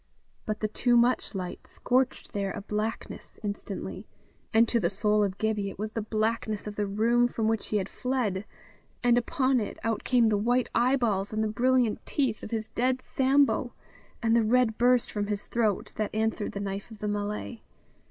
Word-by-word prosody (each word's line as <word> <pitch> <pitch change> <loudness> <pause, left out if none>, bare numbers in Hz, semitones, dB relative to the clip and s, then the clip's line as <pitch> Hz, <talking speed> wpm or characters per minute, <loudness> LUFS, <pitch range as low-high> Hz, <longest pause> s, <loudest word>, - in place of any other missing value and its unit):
But 215 0 -2
the 215 - +1
too 240 +3 +2
much 235 -2 +2
light 180 -2 -5
scorched 255 +1 0
there 200 -1 -1
a - - -5
blackness 210 +2 -4
instantly; 205 -1 -5 0.4
and 225 +1 +5
to 235 - +2
the 170 -5 +1
soul 210 +1 +2
of 195 -1 -2
Gibbie 215 -2 0
it - - -10
was 215 +2 -4
the 225 - -2
blackness 215 0 -1
of 210 -1 -6
the 205 -1 -1
room 230 +4 +3
from 225 -2 -1
which 225 -1 0
he 210 - 0
had 195 -2 -1
fled, 225 -7 -2 0.6
and 240 -1 +5
upon 260 +1 +2
it 210 - -4
out 225 -1 -1
came 240 -3 +4
the 210 -2 +2
white 245 +3 +1
eyeballs 235 -6 +2
and 215 0 0
the - - +1
brilliant 245 +1 +2
teeth 260 -7 -1
of - - -7
his 220 -1 -3
dead 255 +1 +1
Sambo, 275 +1 +2 0.5
and 225 0 +3
the 235 - +5
red 230 0 +3
burst 245 0 +3
from 205 -1 -2
his 205 -1 -3
throat 220 -4 0
that 215 -1 0
answered 220 -1 -1
the 200 - -4
knife 200 +1 -4
of 220 - -11
the 210 - -4
Malay. 205 +2 -3
220 Hz, 190 wpm, -28 LUFS, 210-240 Hz, 0.6 s, and